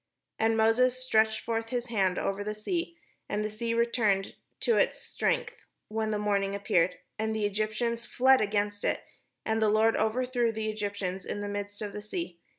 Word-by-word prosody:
And 225 Hz, 0 st, +3 dB
Moses 240 Hz, +3 st, +4 dB
stretched 220 Hz, -4 st, +2 dB
forth 225 Hz, 0 st, -2 dB
his 245 Hz, 0 st, -2 dB
hand 190 Hz, -5 st, +1 dB
over 195 Hz, +1 st, -1 dB
the 210 Hz, +1 st, -3 dB
sea, 340 Hz, -, -3 dB, 0.3 s
and 210 Hz, +1 st, -1 dB
the 215 Hz, -, -3 dB
sea 230 Hz, +2 st, -2 dB
returned 230 Hz, -4 st, +1 dB, 0.3 s
to 470 Hz, -, +3 dB
his -, -, +2 dB
strength -, -, -2 dB, 0.2 s
when 220 Hz, 0 st, -1 dB
the 210 Hz, -, 0 dB
morning 200 Hz, -1 st, 0 dB
appeared; 185 Hz, -3 st, +2 dB, 0.2 s
and 220 Hz, 0 st, 0 dB
the 215 Hz, -1 st, 0 dB
Egyptians 220 Hz, +3 st, -1 dB
fled 260 Hz, +2 st, +4 dB
against 205 Hz, 0 st, 0 dB
it; -, -, 0 dB, 0.4 s
and 220 Hz, 0 st, +1 dB
the 215 Hz, -, +4 dB
Lord 220 Hz, +2 st, +4 dB
overthrew 240 Hz, +2 st, +1 dB
the 220 Hz, 0 st, -2 dB
Egyptians 200 Hz, -3 st, -3 dB
in 205 Hz, -, -4 dB
the 205 Hz, -, -3 dB
midst 205 Hz, +1 st, -4 dB
of 205 Hz, -1 st, -5 dB
the 210 Hz, -, -5 dB
sea. 210 Hz, -, -5 dB
215 Hz, 180 wpm, -29 LUFS, 205-230 Hz, 0.4 s, Moses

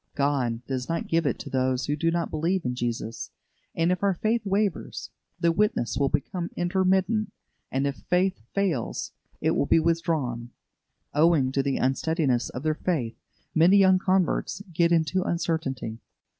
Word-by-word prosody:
God 130 Hz, -5 st, 0 dB
does 130 Hz, +1 st, -4 dB
not 165 Hz, -, -2 dB
give 165 Hz, -2 st, +1 dB
it -, -, 0 dB
to -, -, -8 dB
those 130 Hz, -1 st, +1 dB
who 145 Hz, -, 0 dB
do 165 Hz, +3 st, +1 dB
not 170 Hz, 0 st, -1 dB
believe 170 Hz, +4 st, 0 dB
in 125 Hz, -, 0 dB
Jesus; 120 Hz, -2 st, -4 dB, 0.5 s
and 165 Hz, +1 st, +2 dB
if 180 Hz, -, -1 dB
our 200 Hz, -2 st, +2 dB
faith 225 Hz, +6 st, 0 dB
wavers, 200 Hz, -1 st, -2 dB, 0.3 s
the 170 Hz, -1 st, +3 dB
witness 205 Hz, -, +1 dB
will 140 Hz, -1 st, +1 dB
become 170 Hz, +5 st, -2 dB
intermittent; 190 Hz, +4 st, +1 dB, 0.4 s
and 135 Hz, +1 st, 0 dB
if 140 Hz, -1 st, -2 dB
faith 180 Hz, -, +2 dB
fails, 185 Hz, -, -1 dB, 0.3 s
it -, -, +2 dB
will -, -, +1 dB
be -, -, +5 dB
withdrawn. 155 Hz, -8 st, -1 dB, 0.6 s
Owing 150 Hz, -4 st, +4 dB
to 135 Hz, -, +1 dB
the 135 Hz, 0 st, -1 dB
unsteadiness 135 Hz, -1 st, +1 dB
of 125 Hz, -, -7 dB
their 155 Hz, 0 st, +2 dB
faith, 145 Hz, -9 st, -2 dB, 0.4 s
many 175 Hz, +5 st, +6 dB
young 190 Hz, -1 st, +5 dB
converts 190 Hz, +1 st, 0 dB
get 170 Hz, +1 st, +3 dB
into 170 Hz, +3 st, +2 dB
uncertainty. 160 Hz, -10 st, -2 dB
165 Hz, 160 wpm, -26 LUFS, 135-180 Hz, 0.6 s, many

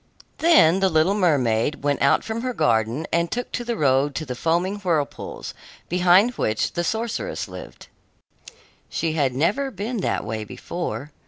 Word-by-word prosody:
Then 255 Hz, -, +5 dB
the 190 Hz, 0 st, +3 dB
little 160 Hz, +3 st, +3 dB
mermaid 145 Hz, -, +1 dB
went 145 Hz, -1 st, 0 dB
out 140 Hz, -, +3 dB
from 225 Hz, +1 st, -4 dB
her 250 Hz, -1 st, -3 dB
garden 115 Hz, +5 st, +1 dB
and 170 Hz, 0 st, +1 dB
took 245 Hz, 0 st, -3 dB
the 240 Hz, -2 st, -3 dB
road 135 Hz, 0 st, +2 dB
to 155 Hz, -, -3 dB
the 130 Hz, -, -4 dB
foaming 170 Hz, +9 st, 0 dB
whirlpools, 165 Hz, -7 st, -3 dB, 0.4 s
behind 180 Hz, +6 st, +4 dB
which 110 Hz, 0 st, 0 dB
the 175 Hz, -, -1 dB
sorceress 230 Hz, -, -3 dB
lived. -, -, -11 dB, 1.0 s
She 165 Hz, -1 st, -1 dB
had 140 Hz, -5 st, 0 dB
never 205 Hz, -, +1 dB
been 235 Hz, 0 st, -4 dB
that 195 Hz, -, -1 dB
way 110 Hz, -1 st, -3 dB
before. 150 Hz, -, -5 dB
170 Hz, 155 wpm, -23 LUFS, 140-205 Hz, 1.0 s, Then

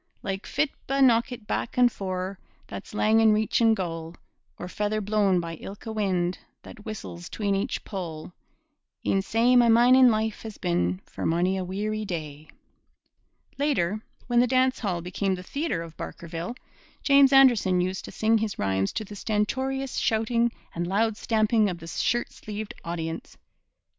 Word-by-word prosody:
Like 195 Hz, 0 st, -4 dB
fitba' 275 Hz, -2 st, 0 dB
knockit 240 Hz, -2 st, +2 dB
back 230 Hz, -, -3 dB
and 245 Hz, -1 st, +5 dB
fore, 185 Hz, -1 st, -4 dB, 0.3 s
That's 205 Hz, -, -9 dB
lang 220 Hz, +1 st, +3 dB
in 220 Hz, -1 st, +5 dB
reachin' 220 Hz, +1 st, +3 dB
goal, 165 Hz, -3 st, -5 dB, 0.4 s
Or 180 Hz, -, -6 dB
feather 210 Hz, +3 st, -1 dB
blown 205 Hz, -3 st, +2 dB
by 165 Hz, -1 st, -5 dB
ilka 205 Hz, +6 st, -8 dB
wind 185 Hz, -4 st, 0 dB, 0.2 s
That 215 Hz, -, -12 dB
whistles 175 Hz, -5 st, -7 dB
'tween 205 Hz, -2 st, -1 dB
each 200 Hz, +6 st, -2 dB
pole 175 Hz, -4 st, -6 dB, 0.7 s
E'en 195 Hz, -, +2 dB
sae 230 Hz, +5 st, +2 dB
my 240 Hz, -1 st, +6 dB
mining 250 Hz, +2 st, +7 dB
life 220 Hz, -1 st, -1 dB
has 220 Hz, -2 st, -8 dB
been 90 Hz, +2 st, 0 dB
For -, -, -8 dB
mony 175 Hz, +3 st, +1 dB
a 190 Hz, -, -2 dB
weary 210 Hz, +4 st, -3 dB
day. 155 Hz, -5 st, -6 dB, 1.1 s
Later, 215 Hz, -, 0 dB, 0.2 s
when 240 Hz, -1 st, +2 dB
the 250 Hz, -, +4 dB
dance 260 Hz, +1 st, +2 dB
hall 185 Hz, -6 st, -2 dB
became 190 Hz, +2 st, -1 dB
the 180 Hz, -, -8 dB
theatre 280 Hz, -, -2 dB
of 165 Hz, -1 st, -11 dB
Barkerville, 170 Hz, +6 st, -6 dB, 0.5 s
James 280 Hz, -1 st, +6 dB
Anderson 240 Hz, -9 st, +5 dB
used 185 Hz, +1 st, -2 dB
to -, -, -9 dB
sing 220 Hz, +1 st, +2 dB
his 215 Hz, -2 st, -3 dB
rhymes 95 Hz, 0 st, 0 dB
to 215 Hz, -, -3 dB
the 205 Hz, -, -10 dB
stentorious 260 Hz, +6 st, -1 dB
shouting 230 Hz, +1 st, +1 dB, 0.2 s
and 175 Hz, +1 st, -3 dB
loud 215 Hz, +4 st, +1 dB
stamping 215 Hz, -1 st, +2 dB
of 180 Hz, -, -4 dB
the 165 Hz, -, -11 dB
shirt 240 Hz, +7 st, -1 dB
sleeved 215 Hz, +2 st, -7 dB
audience. 165 Hz, -1 st, -5 dB
210 Hz, 160 wpm, -26 LUFS, 180-230 Hz, 1.1 s, mining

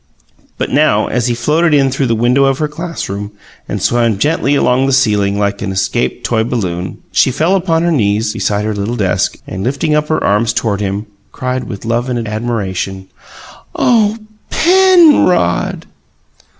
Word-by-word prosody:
But -, -, -3 dB
now, 140 Hz, -7 st, +3 dB
as 120 Hz, 0 st, -1 dB
he 120 Hz, -, 0 dB
floated 150 Hz, +6 st, +2 dB
in 135 Hz, -2 st, +2 dB
through 135 Hz, 0 st, -1 dB
the 115 Hz, -, +1 dB
window 125 Hz, +4 st, +2 dB
of 135 Hz, -1 st, +1 dB
her 150 Hz, -, -1 dB
classroom 150 Hz, -, -6 dB, 0.4 s
and -, -, -2 dB
swam 115 Hz, -3 st, +1 dB
gently 145 Hz, +3 st, +1 dB
along 130 Hz, -1 st, +2 dB
the 135 Hz, -, +1 dB
ceiling 105 Hz, -6 st, +2 dB
like 100 Hz, 0 st, -1 dB
an 100 Hz, -, -3 dB
escaped 95 Hz, -9 st, -1 dB
toy 110 Hz, -2 st, +1 dB
balloon, 95 Hz, -7 st, -3 dB
she -, -, +3 dB
fell 160 Hz, +9 st, +1 dB
upon 170 Hz, -3 st, +1 dB
her 170 Hz, -, +1 dB
knees 105 Hz, -5 st, +1 dB
beside 105 Hz, 0 st, -1 dB
her 110 Hz, -, -1 dB
little 105 Hz, +4 st, -3 dB
desk, 100 Hz, -6 st, 0 dB
and, 95 Hz, +1 st, -6 dB
lifting 140 Hz, +6 st, -1 dB
up 150 Hz, 0 st, +1 dB
her 155 Hz, -, -1 dB
arms 105 Hz, +2 st, +1 dB
toward 105 Hz, -3 st, -1 dB
him, 100 Hz, +1 st, -3 dB, 0.3 s
cried 130 Hz, 0 st, -3 dB
with 100 Hz, -2 st, -8 dB
love 120 Hz, +2 st, -1 dB
and 120 Hz, -3 st, -2 dB
admiration: 100 Hz, -4 st, -3 dB, 0.7 s
"Oh, 220 Hz, -3 st, +2 dB, 0.3 s
PENrod!" 340 Hz, -, +3 dB
120 Hz, 165 wpm, -14 LUFS, 105-150 Hz, 0.7 s, now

